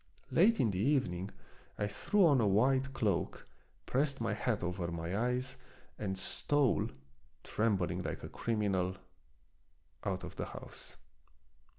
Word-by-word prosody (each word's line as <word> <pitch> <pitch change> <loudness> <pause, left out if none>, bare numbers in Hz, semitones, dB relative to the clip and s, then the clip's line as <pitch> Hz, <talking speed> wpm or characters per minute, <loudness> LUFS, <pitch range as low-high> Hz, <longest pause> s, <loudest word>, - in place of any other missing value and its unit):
Late 200 - +5
in 110 - +3
the 90 - -2
evening 100 -7 +1 0.5
I 105 - 0
threw 180 - +3
on 140 -6 +5
a 105 - +3
wide 130 +7 +3
cloak, 105 -9 -1 0.4
pressed 140 +1 0
my 115 -1 0
hat 115 -7 -1
over 90 0 -2
my 85 +2 -3
eyes, 125 +3 0 0.4
and 95 -2 -2
stole, 130 0 +1 0.6
trembling 95 -5 0
like - - -4
a - - -5
crimi 105 -3 0
nal, 95 0 0 1.1
out - - -2
of - - -8
the - - -2
house. - - -9
110 Hz, 135 wpm, -34 LUFS, 95-130 Hz, 1.1 s, Late